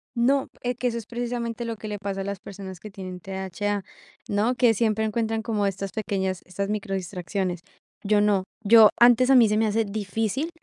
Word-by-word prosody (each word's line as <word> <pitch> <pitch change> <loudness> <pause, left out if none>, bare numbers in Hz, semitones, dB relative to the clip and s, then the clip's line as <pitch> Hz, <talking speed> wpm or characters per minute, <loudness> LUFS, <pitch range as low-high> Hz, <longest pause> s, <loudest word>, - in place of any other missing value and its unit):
No, 265 +3 +2 0.2
eh, 245 0 -1
que 250 +1 -1
eso 235 -1 -1
es 225 - -6
precisamente 235 -1 -4
lo 230 -1 -4
que 215 - -8
le 210 -1 -4
pasa 195 -1 -3
a - - -2
las 200 -1 -4
personas 190 -3 -9
que 215 - -9
tienen 185 -2 -8
TDHA, 195 +2 -3 0.4
¿no? 215 +5 +1
Que 240 -3 +4
siempre 220 0 +1
encuentran 225 0 -1
como 210 -3 0
estas 195 0 -4
pequeñas, 190 -4 -2
estas 195 +2 -3
micro 205 -2 -2
distracciones. 180 -1 -3 0.4
Yo 205 0 +3
no, 205 -2 +2 0.2
yo 220 0 +8
antes 245 +2 +6
a 270 - +7
mí 235 -3 +7
se 210 - +1
me 220 0 +2
hacía 220 +2 +1
difícil 220 - -2
210 Hz, 205 wpm, -25 LUFS, 195-230 Hz, 0.4 s, yo